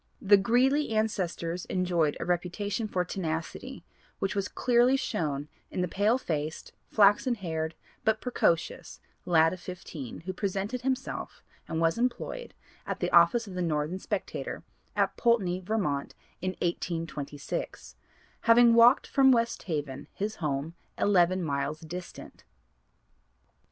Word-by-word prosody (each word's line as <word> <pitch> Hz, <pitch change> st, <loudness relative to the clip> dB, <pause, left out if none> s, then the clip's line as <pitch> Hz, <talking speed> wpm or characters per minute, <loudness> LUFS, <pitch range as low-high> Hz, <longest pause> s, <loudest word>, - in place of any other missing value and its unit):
The 205 Hz, +1 st, +6 dB
Greeley 255 Hz, +8 st, +3 dB
ancestors 180 Hz, -5 st, -1 dB
enjoyed 175 Hz, -5 st, 0 dB
a -, -, -3 dB
reputation 185 Hz, +5 st, -1 dB
for 180 Hz, -3 st, -1 dB
'tenacity,' 160 Hz, -3 st, -4 dB, 0.3 s
which 195 Hz, +1 st, -1 dB
was 200 Hz, 0 st, 0 dB
clearly 245 Hz, +2 st, +3 dB
shown 145 Hz, -, -2 dB, 0.2 s
in -, -, -3 dB
the 180 Hz, -, +1 dB
pale 205 Hz, +7 st, +2 dB
faced, 155 Hz, -, -4 dB, 0.2 s
flaxen 210 Hz, +4 st, +4 dB
haired 160 Hz, -5 st, -3 dB, 0.3 s
but 220 Hz, 0 st, +2 dB
precocious 195 Hz, -9 st, -1 dB, 0.3 s
lad 165 Hz, -1 st, +4 dB
of 185 Hz, -, -7 dB
fifteen, 165 Hz, -7 st, -8 dB
who 185 Hz, +3 st, -5 dB
presented 200 Hz, +5 st, -2 dB
himself 265 Hz, +1 st, -3 dB, 0.2 s
and 160 Hz, -, -2 dB
was 165 Hz, +6 st, +2 dB
employed 250 Hz, -, -2 dB, 0.3 s
at -, -, -3 dB
the -, -, -1 dB
office 175 Hz, +8 st, +5 dB
of 195 Hz, -, -9 dB
the 180 Hz, -, -3 dB
Northern 160 Hz, +1 st, -1 dB
Spectator, -, -, -4 dB, 0.3 s
at -, -, +1 dB
Poultney, 200 Hz, -7 st, +2 dB
Vermont, 185 Hz, -8 st, -2 dB, 0.3 s
in 185 Hz, +1 st, -1 dB
1826; 165 Hz, -5 st, -4 dB, 0.5 s
having 235 Hz, 0 st, +7 dB
walked 235 Hz, +4 st, +6 dB
from 270 Hz, -2 st, +5 dB
West 235 Hz, -1 st, +1 dB
Haven, 145 Hz, -4 st, -4 dB
his 215 Hz, +2 st, -3 dB
home, 150 Hz, 0 st, -2 dB, 0.2 s
eleven 185 Hz, -2 st, +3 dB
miles 140 Hz, 0 st, -2 dB
distant. 175 Hz, +2 st, -9 dB
185 Hz, 130 wpm, -29 LUFS, 165-220 Hz, 0.5 s, having